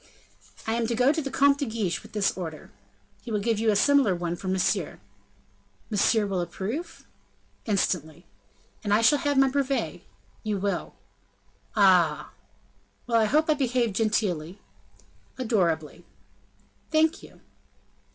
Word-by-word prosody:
"I 225 - -1
am 230 0 0
to 235 - -1
go 250 +4 +4
to 315 +1 -1
the 275 - -4
Comte 280 +1 +3
de 285 - 0
Guiche 215 -6 -2
with - - -16
this 210 -2 +1
order?" 165 -4 -7 0.5
"He 245 - -10
will 210 - 0
give 225 +1 0
you 225 0 +2
a 210 - +3
similar 270 -3 +4
one 175 0 -3
for 185 - -8
Monsieur." 190 0 0 0.9
"Monsieur 215 +1 +2
will 195 -3 -1
approve?" 215 - -5 0.6
"Instantly." 175 -5 -1 0.6
"And 205 -1 +2
I 220 - +3
shall 250 +6 +4
have 285 0 0
my 270 0 +5
brevet?" 265 - -1 0.4
"You 210 -2 -2
will." 200 +1 -3 0.8
"Ah!" 180 -7 +3 0.7
"Well, 230 -2 +2
I - - +3
hope 305 +8 +2
I 310 - +4
behave 250 -6 0
genteely?" 195 -5 -1 0.8
"Adorably." 175 - -1 0.9
"Thank 315 0 +2
you." - - -15
215 Hz, 140 wpm, -26 LUFS, 190-260 Hz, 0.9 s, my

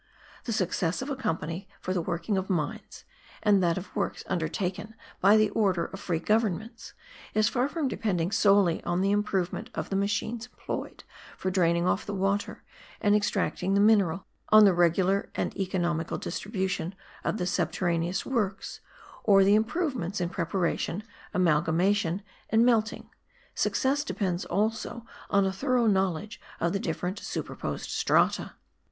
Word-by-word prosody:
The 235 - -2
success 180 -1 0
of 285 - -5
a - - -1
company 170 - -3
for 185 - -3
the 180 - 0
working 170 +4 -2
of 190 0 -2
mines, 160 -6 -3 0.4
and 205 -3 +4
that 170 -1 +2
of 185 - -7
works 200 - -2
undertaken 180 +5 -3 0.2
by 200 +3 +6
the 215 -1 +3
order 190 -6 +1
of 195 - -8
free 175 -4 -1
governments, 215 +3 -1 0.4
is 215 0 +4
far 255 +2 0
from 310 -2 -1
depending 185 -8 -1
solely 200 -4 +3
on 175 +1 0
the 195 +1 +2
improvement 200 -3 -1
of - - -4
the - - 0
machines 210 +4 -1
employed - - -6 0.3
for 185 - -2
draining 170 -2 +2
off 185 - +1
the 205 - -3
water, 195 +1 -1 0.4
and 205 0 +3
extracting 195 -2 0
the - - +4
mineral, 200 -4 +3 0.2
on 215 0 +8
the 195 - +6
regular 180 +3 +2
and - - -2
economical 175 -4 -1
distribution 190 -1 -3 0.3
of - - -1
the 180 - -1
subterraneous 175 -1 0
works, 210 -7 -2 0.4
or 195 -2 +6
the 200 +1 +5
improvements 220 - 0
in 175 -1 -1
preparation, 175 +2 -1 0.3
amalgamation, 175 +3 +2 0.3
and 225 +2 +4
melting: 225 -2 +1 0.4
success 280 +2 +1
depends 185 - -2
also 220 +2 -2 0.2
on 200 -1 +3
a 190 - 0
thorough 250 +3 +1
knowledge 195 -1 0 0.2
of 170 +2 0
the 200 - 0
different 180 +3 -3
superposed - - -5
strata. - - +2
195 Hz, 150 wpm, -28 LUFS, 175-215 Hz, 0.4 s, on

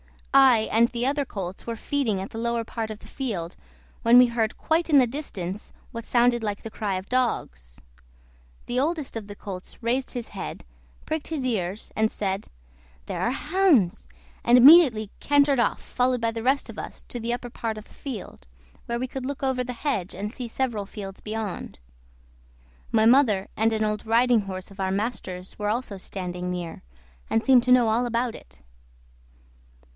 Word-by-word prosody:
I 265 -4 +7
and 230 +2 +5
the 240 0 -3
other 285 +1 +1
colts 190 -4 -6
were 230 - -2
feeding 230 -6 -1
at 195 - -7
the 225 - -6
lower 235 0 0
part 225 0 -4
of 215 -1 -7
the - - -15
field 190 -11 -4 0.5
when 235 +1 +6
we 250 0 +8
heard, 230 -2 -1
quite 330 +1 0
in 295 - +6
the 260 - +7
distance, 210 - -6 0.2
what 230 -2 -6
sounded 240 0 +3
like 205 -2 -3
the 225 - -7
cry 205 -3 -2
of 185 +1 -6
dogs. 65 - -2 0.8
The 245 - -1
oldest 305 -1 -1
of 215 -3 -7
the 205 - -8
colts 195 +2 -9
raised 250 +3 0
his 240 -2 -5
head, 195 - -6 0.4
pricked 315 -1 -3
his 300 -5 -3
ears, 200 -4 -2
and 220 0 +2
said, 195 -1 -3 0.6
"There - - -4
are - - +2
the 255 - -1
hounds!" 295 - +2 0.4
and 240 +1 +6
immediately 250 - +7
cantered 285 -2 +3
off, 235 - +1
followed 250 -1 0
by 230 0 +1
the 225 0 -5
rest 270 +3 +2
of - - -8
us - - -8
to 240 - -5
the 235 +1 -1
upper 245 0 -5
part 225 -2 -3
of 215 - -7
the - - -20
field, 215 - -8 0.4
where 235 - -2
we 255 +2 -2
could 260 0 -6
look 280 +1 -5
over 260 -1 +1
the 250 - -4
hedge 230 - -2
and 205 +3 -4
see 245 0 -6
several 230 -4 -2
fields 195 -2 -8
beyond. 215 -3 -5 1.1
My 220 -1 +4
mother 225 -6 +4
and 225 +1 +3
an 220 0 0
old 210 0 -2
riding 235 0 +4
horse 185 -1 -7
of 195 - -15
our 190 -1 0
master's 195 -3 -4
were 210 0 -1
also 215 -3 -2
standing 180 -1 -5
near, 175 -2 -5 0.5
and 225 - +1
seemed 255 -3 +6
to 250 - +1
know 245 -3 +6
all 235 +3 +1
about 235 0 0
it. - - -15
230 Hz, 190 wpm, -25 LUFS, 205-255 Hz, 1.1 s, we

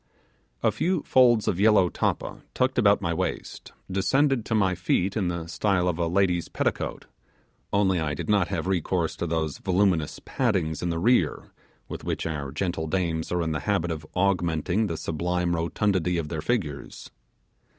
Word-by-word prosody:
A 110 - +4
few 170 - 0
folds 120 -4 +4
of 90 - 0
yellow 105 -3 +5
tappa - - -2
tucked 130 0 +1
about 100 -3 +4
my 85 -1 0
waist, - - -4 0.2
descended 135 +6 +2
to 110 - -1
my 95 -4 +3
feet 90 +2 0
in 100 -5 0
the 85 -2 -3
style 90 +2 0
of 90 -1 -1
a 85 - +1
lady's 90 -1 +1
petticoat, - - -2 0.7
only 95 -3 +2
I 75 -2 -1
did - - -5
not 100 -4 +3
have 80 - -3
recourse 90 -3 0
to 85 - -2
those 80 -2 -2
voluminous 95 -4 +1
paddings 95 - 0
in 85 - -1
the 85 - -1
rear 90 -4 +1 0.4
with - - -7
which - - -3
our 75 -4 -3
gentle 80 0 -2
dames 85 -2 -1
are 90 -1 +1
in 80 - -1
the 75 - -1
habit 85 -4 +1
of 80 -1 -4
augmenting 90 +1 +1
the 85 -3 -3
sublime 85 +2 -1
rotundity 90 +1 0
of 80 -3 -3
their 80 -2 -3
figures. 80 - -3
90 Hz, 170 wpm, -26 LUFS, 80-100 Hz, 0.7 s, yellow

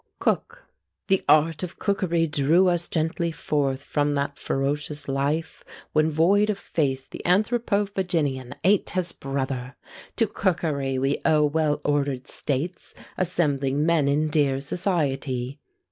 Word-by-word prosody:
COOK. - - -1 0.4
"The 195 -1 +3
art 155 0 +4
of 180 -1 -6
cookery 185 -5 +1
drew 155 +4 +3
us 175 -1 0
gently 165 +1 -1
forth 140 -3 -1
From 145 0 0
that 140 0 -2
ferocious 145 +2 -2
life, 140 +4 -1 0.3
when 155 +1 +3
void 190 +7 +3
of 210 - 0
faith 135 -8 -2
The - - -7
Anthropophaginian 190 - 0
ate 195 +3 +3
his 180 -2 -1
brother! 135 -1 -4 0.4
To 225 - +3
cookery 155 -10 -1
we 135 +2 0
owe 150 -1 +4
well 150 0 +1
ordered 140 -3 0
states, 150 +6 -4 0.2
Assembling 150 -5 0
men 165 -4 +3
in 150 +2 +1
dear 145 -3 +2
society. 140 -5 -2
150 Hz, 130 wpm, -25 LUFS, 140-175 Hz, 0.4 s, art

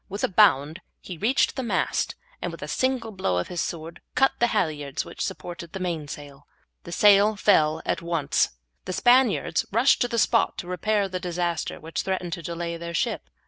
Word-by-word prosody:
With 200 +2 -5
a - - +4
bound 170 -5 +3 0.2
he 180 - -8
reached 245 +7 +2
the 265 - -2
mast, 240 - -1 0.3
and - - -3
with - - -9
a - - -5
single 260 -4 -1
blow 185 - -1
with 90 - -2
his 175 - -2
sword 165 0 -5
cut 270 +1 +4
the 240 - +4
halyards 150 - -1
which - - -9
supported 170 -1 -6
the 195 - -4
main 170 -5 -3
sail. 145 -1 -10 0.4
The 170 - -8
sail 205 +3 +5
fell 160 -6 +3
at 175 - -1
once. 165 -4 +1 0.4
The 185 - -3
Spaniards 245 +2 +3
rushed 235 +6 +4
to 245 - +3
the 235 -1 -3
spot 230 -1 +2
to 200 -5 -6
repair 200 +3 0
the 185 -1 -4
disaster 175 -1 -2
which 160 +1 -4
threatened 185 -3 -3
to 170 - -4
delay 170 +1 -4
their 170 0 -6
ship. - - -1
180 Hz, 195 wpm, -25 LUFS, 165-215 Hz, 0.4 s, sail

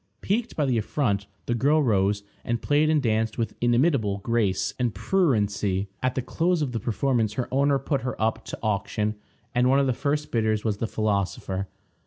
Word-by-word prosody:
Piqued 225 +4 -1
by 150 - +1
the 125 -4 +2
affront, 105 -4 -1 0.2
the 120 - 0
girl 145 +6 +3
rose, 100 -3 +2 0.2
and 120 0 -1
played 150 +1 +3
and 155 -2 +2
danced 110 -1 0
with 115 -3 -1
inimitable 120 -4 +2
grace 115 -5 +1
and 120 -4 0
pruriency. 105 - +1
At 130 0 0
the 130 - -1
close 165 +4 +1
of 135 - -2
the 115 - -2
performance 115 -1 0
her 125 +2 -2
owner 140 +1 +3
put 135 0 -1
her 125 - -4
up 110 0 0
to - - -6
auction, 105 0 0 0.4
and 125 +1 +3
one 135 - +4
of 140 - +3
the 130 - +1
first 145 +3 -2
bidders 110 -2 +1
was 105 -2 0
the 115 - -2
philosopher. 100 -2 -1
120 Hz, 190 wpm, -25 LUFS, 105-140 Hz, 0.4 s, one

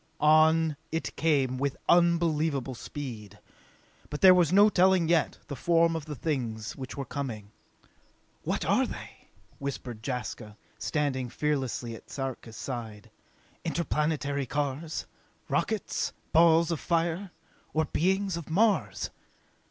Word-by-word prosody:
On 155 0 +4
it 160 +1 -3
came 135 -5 +1
with 140 0 -1
unbelievable 165 -6 +2
speed. 115 -6 -7 0.7
But 150 - -5
there 185 -1 +9
was 175 -3 +3
no 200 +3 +7
telling, 185 -4 +4
yet, 165 -2 +2
the 140 - -6
form 165 +3 +3
of 160 -2 -4
the 150 -1 -6
things 120 -7 -3
which 130 0 -7
were 140 - -3
coming. 115 -9 -5 0.9
"What - - -2
are - - +3
they?" - - -10 0.3
whispered 130 -4 -5
Jaska, 115 -4 -5 0.2
standing 135 -5 -1
fearlessly 130 -4 -2
at 115 - -12
Sarka's 130 -4 -5
side. 115 -5 -6 0.5
"Interplanetary 150 -4 -1
cars? 145 +3 -2 0.4
Rockets? - - -1 0.2
Balls 165 0 +5
of 165 - -1
fire? 170 +3 0 0.4
Or 160 0 +1
beings 190 +3 0
of 165 -3 -8
Mars?" 210 +6 +1
150 Hz, 120 wpm, -28 LUFS, 130-165 Hz, 0.9 s, there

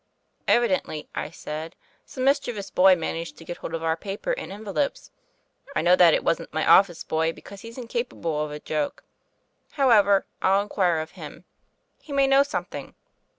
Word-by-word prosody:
"Evidently," 185 -9 +1
I - - -4
said, 155 0 -7 0.3
"some 255 - -5
mischievous 245 -7 0
boy 185 0 +6
managed 165 0 -4
to - - -12
get 175 - -6
hold 165 - -5
of 165 - -5
our 160 0 +1
paper 200 - -4
and - - -4
en 210 +2 -9
velopes. 275 +8 -2 0.6
I - - +1
know 175 +1 +6
that 175 -3 +6
it - - -1
wasn't - - -1
my 155 - -1
office 185 -4 +5
boy, 160 +1 0
because 200 +3 -12
he's 230 +2 -10
incapable 235 -11 -3
of 150 - -4
a 150 0 -6
joke. 150 -1 -3 0.7
However, 210 -8 +4 0.2
I'll 195 +1 +3
inquire 185 -5 +1
of 160 - -8
him; - - -11 0.6
he 300 - -13
may 275 -1 +4
know 270 0 +5
something. 285 +1 -4
190 Hz, 175 wpm, -25 LUFS, 165-235 Hz, 0.7 s, boy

